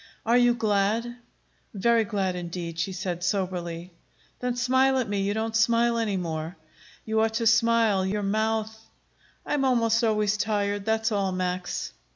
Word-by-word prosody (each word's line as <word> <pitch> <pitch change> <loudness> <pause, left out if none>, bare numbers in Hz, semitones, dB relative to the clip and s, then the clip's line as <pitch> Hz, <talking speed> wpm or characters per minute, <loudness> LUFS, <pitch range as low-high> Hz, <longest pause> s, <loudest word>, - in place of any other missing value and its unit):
"Are 230 +2 +3
you 245 -1 +4
glad?" 220 +2 0 0.6
"Very 230 +3 +2
glad, 195 -4 -1
indeed," 170 -1 -5
she 190 +3 -1
said 180 -2 -4
soberly. 180 -2 -3 0.5
"Then 250 -1 -2
smile 260 +2 +2
at 255 - 0
me. 200 -1 -1
You 200 +1 -1
don't 220 0 -2
smile 230 +1 +3
any 210 -4 -1
more. 165 -1 -4 0.5
You 220 0 +1
ought 220 0 0
to 230 0 0
smile; 225 -3 +3
your 205 +2 -2
mouth 220 +2 -1 0.4
" - - -34
"I - - -2
am 290 -2 +1
almost 230 -3 +2
always 215 -2 +1
tired; 205 -1 -1
that's 220 +1 0
all, 200 -2 0
Max." 185 0 -3
215 Hz, 165 wpm, -26 LUFS, 190-230 Hz, 0.6 s, you